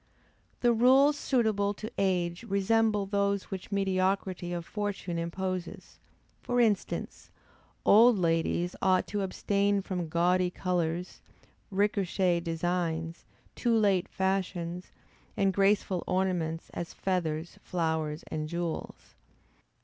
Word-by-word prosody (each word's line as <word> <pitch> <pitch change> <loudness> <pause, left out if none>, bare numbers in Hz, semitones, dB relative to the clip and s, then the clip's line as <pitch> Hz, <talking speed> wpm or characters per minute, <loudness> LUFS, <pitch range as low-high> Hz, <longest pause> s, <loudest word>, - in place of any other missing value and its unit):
The 240 -1 +4
rules 265 +5 +5
suitable 220 -8 +1
to 215 +2 -7
age 180 -2 0
resemble 210 +1 +2
those 200 0 -1
which 190 +1 -6
mediocrity 190 -2 0
of 170 -1 -4
fortune 205 -5 -3
imposes; 180 +1 -5 0.4
for 245 0 -1
instance, 215 -5 0 0.6
old 230 +2 +7
ladies 170 0 0
ought 185 -1 +3
to 205 0 -2
abstain 200 +1 +1
from 180 -4 -3
gaudy 180 +2 +2
colors, 175 -1 -2 0.5
recherché 190 -3 +1
designs, 165 -1 -2 0.3
too 235 -2 +1
late 195 -4 +2
fashions, 185 -2 -2 0.5
and 195 -2 +2
graceful 195 -2 +2
ornaments, 180 -3 -1
as 170 - -6
feathers, 170 -3 -2
flowers, 160 -3 -2
and 155 0 -3
jewels. 170 -1 -5
185 Hz, 105 wpm, -29 LUFS, 170-200 Hz, 0.6 s, old